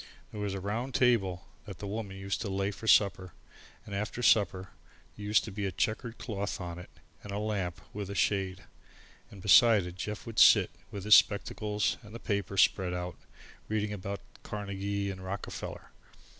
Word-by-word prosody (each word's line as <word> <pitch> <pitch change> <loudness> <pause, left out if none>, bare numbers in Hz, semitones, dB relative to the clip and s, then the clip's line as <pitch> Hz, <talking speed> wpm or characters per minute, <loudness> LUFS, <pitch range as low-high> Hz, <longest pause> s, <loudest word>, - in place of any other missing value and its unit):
There 105 - -6
was 100 -1 -2
a - - -3
round 115 +7 -3
table 100 -8 +2 0.2
that - - -8
The - - -7
Woman 100 -1 -5
used 95 0 -3
to 110 - -3
lay 95 +1 -1
for 110 +2 -9
supper, 95 -4 +4 0.5
and 100 - -8
after 105 +4 -3
supper 95 -4 +3 0.5
there 105 - -8
used 105 +1 +4
to 110 - -7
be 100 0 -2
a - - -3
chequered 115 - -2
cloth 100 -3 -4
on 85 -2 -6
it 90 - -11 0.3
and 105 - -9
a 100 - -3
lamp 100 -5 -2
with 100 -1 -5
a 100 - -5
shade. 95 -2 0 0.7
And 100 -3 -12
beside 105 -1 +6
it 90 0 -8
Jeff 105 +2 -5
would 115 -2 -3
sit, - - +7 0.2
with 100 -2 -7
his 105 +1 +5
spectacles 105 -1 +3
on 110 - -14
and 105 - -11
the - - -6
paper 100 -3 -2
spread 90 -1 +3
out, 90 0 -4 0.5
reading 105 -1 -1
about 100 0 -5 0.2
Carnegie 100 -1 -3
and 95 -1 -9
Rockefeller. 95 +2 -6
100 Hz, 185 wpm, -30 LUFS, 95-105 Hz, 0.7 s, sit